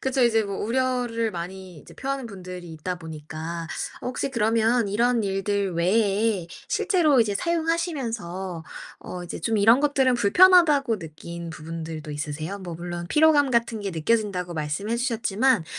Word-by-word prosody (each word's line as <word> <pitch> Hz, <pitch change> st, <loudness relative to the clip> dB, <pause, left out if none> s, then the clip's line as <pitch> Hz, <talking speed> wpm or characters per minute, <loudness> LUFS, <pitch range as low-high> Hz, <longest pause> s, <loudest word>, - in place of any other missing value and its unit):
그쵸. 265 Hz, -1 st, +1 dB
이제 225 Hz, -2 st, +4 dB
뭐 200 Hz, -2 st, -4 dB
우려를 240 Hz, -1 st, 0 dB
많이 180 Hz, -1 st, -7 dB
이제 -, -, -15 dB
표하는 275 Hz, -2 st, -3 dB
분들이 180 Hz, -4 st, -8 dB
있다 180 Hz, +3 st, -4 dB
보니까 160 Hz, +1 st, -6 dB, 0.4 s
혹시 255 Hz, +2 st, -2 dB
그러면 230 Hz, -1 st, +2 dB
이런 235 Hz, +3 st, +2 dB
일들 195 Hz, 0 st, -1 dB
외에 200 Hz, +1 st, +1 dB, 0.2 s
실제로 310 Hz, -, +3 dB
이제 210 Hz, -3 st, +1 dB
사용하시면서 235 Hz, -, -2 dB, 0.4 s
어 180 Hz, -1 st, -7 dB
이제 170 Hz, -, -7 dB
좀 225 Hz, +6 st, 0 dB
'이런 225 Hz, +5 st, +6 dB
것들은 285 Hz, -3 st, +2 dB
좀 -, -, +3 dB
불편하다.'고 285 Hz, -, +5 dB
느낀 170 Hz, +1 st, -8 dB
부분들도 160 Hz, -1 st, -7 dB
있으세요? 155 Hz, +6 st, -4 dB
뭐 175 Hz, -3 st, -7 dB
물론 175 Hz, 0 st, -5 dB
"피로감 300 Hz, -3 st, +4 dB
같은 235 Hz, -2 st, +1 dB
게 200 Hz, -1 st, -3 dB
느껴진다."고 180 Hz, +1 st, 0 dB
말씀해 160 Hz, +9 st, -2 dB
주셨지만 235 Hz, -3 st, +1 dB
205 Hz, 345 characters per minute, -25 LUFS, 175-245 Hz, 0.4 s, 이런